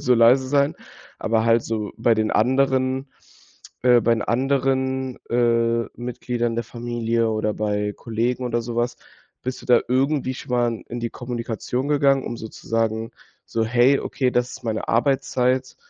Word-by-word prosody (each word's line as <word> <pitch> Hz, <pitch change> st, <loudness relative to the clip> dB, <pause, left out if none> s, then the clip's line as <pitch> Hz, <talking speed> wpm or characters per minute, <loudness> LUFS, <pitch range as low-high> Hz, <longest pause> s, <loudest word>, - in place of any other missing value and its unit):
so 125 Hz, -1 st, +3 dB
leise 120 Hz, +3 st, +5 dB
sein?“ 140 Hz, +2 st, +2 dB, 0.4 s
Aber 110 Hz, 0 st, +1 dB
halt 115 Hz, 0 st, +3 dB
so 110 Hz, -2 st, -3 dB
bei 115 Hz, -, +3 dB
den 110 Hz, 0 st, 0 dB
anderen, 130 Hz, +2 st, +1 dB, 0.7 s
äh 125 Hz, -1 st, +6 dB
bei 115 Hz, +1 st, +3 dB
den 110 Hz, -, -2 dB
anderen, 130 Hz, +1 st, 0 dB
äh, 115 Hz, -1 st, +2 dB
Mitgliedern 120 Hz, -1 st, -3 dB
der 115 Hz, -, -1 dB
Familie 115 Hz, -1 st, -1 dB
oder 110 Hz, -1 st, -1 dB
bei 105 Hz, -1 st, -1 dB
Kollegen 120 Hz, +4 st, -2 dB
oder 120 Hz, -1 st, -1 dB
so 115 Hz, 0 st, -6 dB
was. 120 Hz, +1 st, 0 dB, 0.5 s
Bist 130 Hz, 0 st, -4 dB
du -, -, -12 dB
da 120 Hz, -1 st, +5 dB
irgendwie 130 Hz, +1 st, +1 dB
schon -, -, -10 dB
mal 120 Hz, -2 st, 0 dB
in 120 Hz, 0 st, -5 dB
die 115 Hz, 0 st, -3 dB
Kommunikation 120 Hz, +2 st, -4 dB
gegangen, 140 Hz, -2 st, +3 dB
um 120 Hz, -, -4 dB
so 110 Hz, -1 st, -7 dB
zu -, -, -14 dB
sagen, 115 Hz, 0 st, 0 dB, 0.4 s
so: 115 Hz, -1 st, -1 dB
„Hey, 120 Hz, +4 st, +4 dB
okay, 130 Hz, -2 st, -1 dB
das 125 Hz, 0 st, 0 dB
ist 130 Hz, -, -10 dB
meine 110 Hz, -1 st, -2 dB
Arbeitszeit. 130 Hz, 0 st, +1 dB
120 Hz, 165 wpm, -23 LUFS, 115-130 Hz, 0.7 s, äh